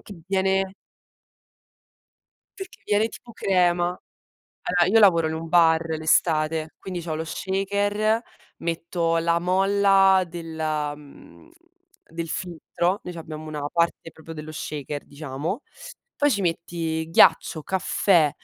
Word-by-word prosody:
Che 190 -6 -12
viene 190 0 +1 1.8
Perché 385 -1 -9
viene 210 +2 +2
tipo 235 - -13
crema 175 -3 +2 0.8
allora 175 -1 +3
io 225 - +7
lavoro 170 -6 +5
in 160 - -3
un 165 +1 -5
bar 165 -1 +4
l'estate, 160 0 +1
quindi 180 -2 -6
c'ho 160 -2 -4
lo 160 - -3
shaker, 205 +5 0 0.4
metto 165 0 -1
la 170 0 +1
molla 195 +1 +4
della, 160 -3 -3
mhmm, 150 - -16 0.6
del 165 0 -5
filtro, 175 +2 -2
noi 180 - -6
c'abbiamo 155 -2 -8
una 150 -2 -5
parte 170 -1 0
proprio 160 +1 -11
dello 155 0 -8
shaker 150 -1 -5
diciamo, 150 - -5 0.6
poi 290 0 +3
ci 200 - 0
metti 165 -2 -2
ghiaccio, 160 -1 +4
caffè, 180 -3 +2
170 Hz, 120 wpm, -24 LUFS, 160-190 Hz, 1.8 s, io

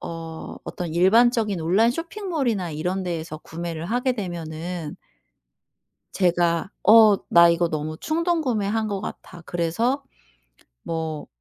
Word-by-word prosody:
어 165 -1 -7
어떤 170 -3 -5
일반적인 215 +2 +3
온라인 195 +8 +3
쇼핑몰이나 305 - -2
이런 180 +5 -2
데에서 165 -3 -4
구매를 165 0 -6
하게 245 +5 0
되면은 170 -5 -5 1.2
제가 175 -1 +1
'어 215 -1 +8
나 170 0 +7
이거 170 0 +2
너무 155 0 -4
충동구매한 255 - 0
것 200 -2 -3
같아.' 175 -4 -8
그래서 225 - -1 0.8
뭐 160 -2 -4
180 Hz, 250 characters per minute, -23 LUFS, 165-230 Hz, 1.2 s, 어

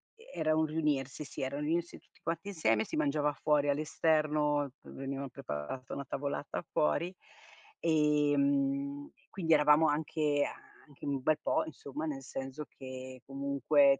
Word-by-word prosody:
e 465 +2 -16
era 155 0 +3
un 160 0 +3
riunirsi, 150 -3 -1
sì - - -7
era 135 +1 -2
un 150 - -2
riunirsi 170 +3 -1
tutti - - -28
quanti 170 +4 -3
insieme, 115 - +2
si - - -5
mangiava 150 0 +2
fuori 145 -1 +2
all'esterno, 150 -1 +2
v - - -14
veniva 135 0 -4
preparata 130 - -5
una 140 - -4
tavolata 140 +2 -3
fuori 170 - +1 0.7
e, 150 -2 +3
mhmm, 140 0 +1 0.2
quindi 165 -4 +1
eravamo 150 +1 +6
anche 150 -1 +1
a - - -7 0.2
anche 145 -2 -20
in 145 - 0
un 135 - -4
bel 155 +3 +3
po', - - +1
insomma 145 0 -6
nel 140 -4 -3
senso 135 +3 -5
che 130 -1 -9
comunque 140 0 +3
145 Hz, 160 wpm, -32 LUFS, 135-155 Hz, 0.7 s, eravamo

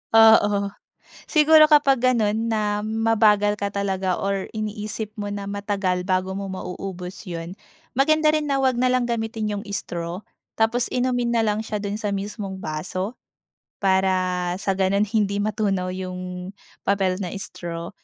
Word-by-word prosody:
Oo, 205 -3 +6 0.6
siguro 310 0 +6
kapag 290 -4 +5
gano'n 230 -3 +2
na 210 -2 0
mabagal 215 -1 +2
ka 200 - 0
talaga 195 -2 -1
or 195 -1 -1
iniisip 215 0 -4
mo 205 - -3
na 205 0 -4
matagal 195 -3 -1
bago 185 0 +1
mo 195 +1 -4
mauubos 185 0 -6
'yon. 170 +2 -6 0.3
Maganda 305 +4 +3
rin 305 -1 0
na 280 - +1
huwag 260 -2 +2
nalang 255 0 +2
gamitin 225 -2 -2
'yung 205 0 -3
straw 175 -1 -4 0.3
tapos 230 +2 +2
inumin 245 -1 +1
na 230 - +3
lang 210 -1 +1
siya 220 -1 -4
doon 205 0 -3
sa 205 -2 -1
mismong 200 0 -5
baso. 185 +5 -4 0.6
Para 190 -1 +3 0.5
sa 195 -1 0
ganoon 195 +2 +2
hindi 205 -2 +1
matunaw 200 -3 0
yung 180 0 -6 0.3
papel 195 -2 +2
na 175 - -4
straw. 170 -4 -6
205 Hz, 145 wpm, -23 LUFS, 190-225 Hz, 0.6 s, Oo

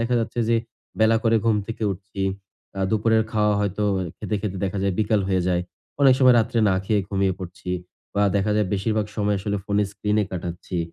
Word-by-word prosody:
দেখা 115 +2 0
যাচ্ছে। 115 +1 -2
যে 115 - +4 0.4
বেলা 110 +1 +5
করে 115 0 +4
ঘুম 110 -2 +3
থেকে 115 0 -6
উঠছি। 95 +1 -9 0.6
আ - - -1
দুপুরের 110 +1 +3
খাওয়া 105 -1 +2
হয়তো 100 +1 -1 0.3
খেতে, 105 - -3
খেতে 100 -2 -3
দেখা 100 +1 -2
যায় 100 -1 +1
বিকাল 105 0 +2
হয়ে 95 -1 +1
যায়। 90 -1 +1 0.4
অনেক 135 -2 +7
সময় 130 -2 +6
রাত্রে 115 +1 +1
না 95 - +3
খেয়ে 105 0 +2
ঘুমিয়ে 95 -1 +1
পড়ছি। 90 0 -7 0.4
বা 100 - +2
দেখা 100 +2 +1
যায় 105 - +2
বেশিরভাগ 105 +1 0
সময় 105 -1 +1
আসলে 100 +1 -2
ফোনে 105 0 +1
স্ক্রিনে 105 +1 0
কাটাচ্ছি। 90 0 -5
105 Hz, 190 wpm, -23 LUFS, 95-110 Hz, 0.6 s, অনেক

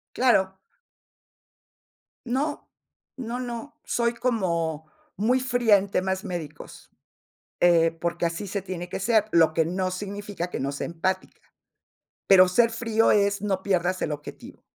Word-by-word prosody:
Claro. 190 -7 +2 1.7
No, 275 +5 -2 0.5
no, 245 -1 -4
no, 245 +3 -7
soy 235 0 0
como 170 -10 -1 0.3
muy 240 +6 +2
fría 245 -4 +3
en 200 +1 -4
temas 190 +1 -1
médicos. 175 -7 -8 0.7
Eh, 170 -2 +5
porque 170 +1 -3
así 170 +5 -4
se 200 0 -3
tiene 180 -2 -6
que - - -5
ser, 215 +1 +2
lo 165 -2 +5
que 160 0 +1
no 185 +2 -1
significa 200 -1 -5
que - - -4
no 140 +1 -2
sea 140 - -4
empática. 185 +3 -3 0.9
Pero, 185 -2 +7
ser 230 +5 +3
frío 225 -1 +1
es 200 -1 +2
no 190 -2 -1
pierdas 185 -1 0
el 155 - -1
objetivo 150 0 -9
190 Hz, 140 wpm, -25 LUFS, 175-225 Hz, 1.7 s, Pero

